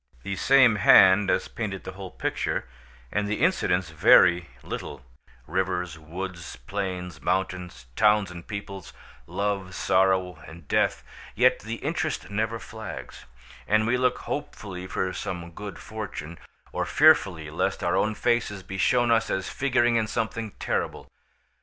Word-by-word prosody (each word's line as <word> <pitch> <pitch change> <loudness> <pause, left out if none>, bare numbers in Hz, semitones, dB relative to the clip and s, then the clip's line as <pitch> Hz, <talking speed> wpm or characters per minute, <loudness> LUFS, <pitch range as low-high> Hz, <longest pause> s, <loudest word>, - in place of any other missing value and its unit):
The 100 - -3
same 130 0 +5
hand 95 0 +7
has - - +1
painted 100 -4 -5
the - - -6
whole 95 0 -8
picture, - - -2 0.4
and 105 0 0
the 105 +1 -2
incidents 90 - +1
vary 85 +2 +5 0.2
little—rivers, 80 +7 -5
woods, 85 +2 -7
plains, 90 +4 -5
mountains, 95 -6 -2
towns 105 -3 +3
and 85 -1 -10
peoples, 100 -3 -7 0.3
love, 100 -3 -2
sorrow, 95 -3 +1
and 80 -2 -13
death: - - +1 0.3
yet 125 +2 +4
the 110 +1 -5
interest 155 -1 -3
never 110 +2 -1
flags, 110 - -9 0.4
and 110 +1 +3
we 115 +2 +2
look 125 0 +1
hopefully 95 -10 -6
for 95 0 -2
some 85 -2 -5
good 105 +4 -8
fortune, 100 -7 -7 0.3
or - - -1
fearfully 80 -5 +3
lest 80 - -1
our - - +1
own 110 0 +1
faces 115 -5 0
be 95 +1 -7
shown 120 +1 +3
us 115 -1 +2
as 95 - -2
figuring 120 -3 +2
in 110 -1 0
something 110 -1 -3
terrible. - - -3
95 Hz, 140 wpm, -26 LUFS, 90-110 Hz, 0.4 s, hand